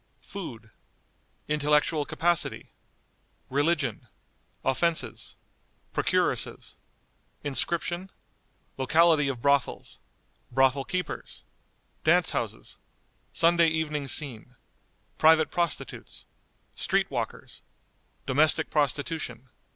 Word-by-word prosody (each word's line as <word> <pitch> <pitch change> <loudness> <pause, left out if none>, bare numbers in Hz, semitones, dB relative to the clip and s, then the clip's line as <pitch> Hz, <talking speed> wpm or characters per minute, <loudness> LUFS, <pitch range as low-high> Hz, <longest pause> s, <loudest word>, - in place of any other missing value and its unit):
Food. 115 - -8 0.8
Intellectual 150 0 +2
Capacity. 170 +1 -1 0.8
Religion. 145 +5 0 0.6
Offenses. 135 -4 -1 0.6
Procuresses. - - 0 0.7
Inscription. 170 +5 0 0.7
Locality 155 +2 +4
of 130 -4 -4
Brothels. 140 -1 +1 0.5
Brothel 135 +1 +2
keepers. 180 0 -5 0.6
Dance - - +4
houses. - - -5 0.5
Sunday 170 0 +4
Evening 155 -3 -1
Scene. 125 -3 -2 0.6
Private 160 0 +5
Prostitutes. 170 -2 -4 0.5
Street - - 0
walkers. - - -5 0.6
Domestic 145 +3 +3
Prostitution. 145 -3 -1
150 Hz, 70 wpm, -27 LUFS, 135-165 Hz, 0.8 s, Private